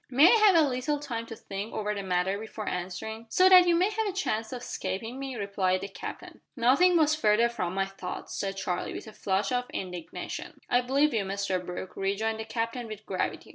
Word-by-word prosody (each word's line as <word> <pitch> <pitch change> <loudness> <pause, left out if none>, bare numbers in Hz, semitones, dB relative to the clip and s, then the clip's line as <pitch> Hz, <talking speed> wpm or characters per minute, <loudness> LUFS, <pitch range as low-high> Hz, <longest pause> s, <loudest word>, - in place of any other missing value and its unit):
"May 285 - +7
I - - +6
have 425 -4 +6
a 320 -3 +6
little 265 +3 -1
time 235 -6 -5
to 225 - -7
think 200 +1 -6
over 210 0 -1
the 200 - -4
matter 190 +1 0
before 215 -1 -7
answering?" 190 +6 -4
"So 370 +10 +5
that 365 -1 +8
you 345 - +4
may 370 +5 +3
have 440 0 -1
a - - 0
chance 225 - -2
of 250 -1 -6
escaping 225 +7 -4
me?" 270 -2 -5
replied 195 -3 0
the 200 - -4
Captain. 195 - -8
"Nothing 280 +9 +4
was 310 -1 +4
further 230 -6 +3
from 190 -7 -3
my 195 0 +1
thoughts," 195 -1 -7
said 195 -1 -3
Charlie, 180 -2 -2
with - - -6
a 220 - -11
flush 195 0 -1
of 250 0 -1
indignation. 180 -3 -6
"I 245 - +3
believe 275 +4 +2
you, 220 -3 +1
Mr 195 -1 -2
Brooke," 180 +1 -6
rejoined 215 +3 -1
the 220 - -4
Captain 230 +2 -3
with 215 -1 -8
gravity. 185 - -3
220 Hz, 215 wpm, -28 LUFS, 195-265 Hz, -, that